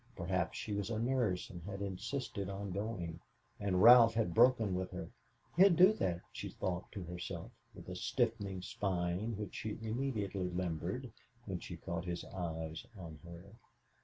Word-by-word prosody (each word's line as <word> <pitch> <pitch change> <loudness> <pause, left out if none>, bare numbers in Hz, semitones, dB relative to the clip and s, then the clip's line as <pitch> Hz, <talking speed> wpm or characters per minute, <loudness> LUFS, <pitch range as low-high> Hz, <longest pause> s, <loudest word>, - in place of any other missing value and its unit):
Perhaps - - -1
she 105 - -3
was 100 +1 -1
a 115 - -1
nurse 115 -6 0
and 85 - -8
had 100 +3 -6
insisted 100 +1 -3
on 100 0 -4
going, 90 -4 -3 0.4
and 95 -2 +2
Ralph 115 -1 +9
had 110 -7 +1
broken 115 -3 +5
with 90 0 -1
her. - - -6 0.4
He'd 185 +1 +7
do 185 +5 +8
that, 90 - -1
she - - -5
thought 90 0 -3
to 100 -4 -5
herself, 90 0 -6 0.2
with - - -11
a - - -5
stiffening 100 -6 -1
spine 100 -1 -1
which 105 -1 -5
she 110 - -4
immediately 110 -5 -2
limbered, 85 -3 -3 0.3
when - - -3
she - - -7
caught 85 0 -4
his 85 -1 -3
eyes 80 -3 -4
on 80 -4 -8
her. 85 +1 -10
100 Hz, 160 wpm, -35 LUFS, 90-115 Hz, 0.4 s, Ralph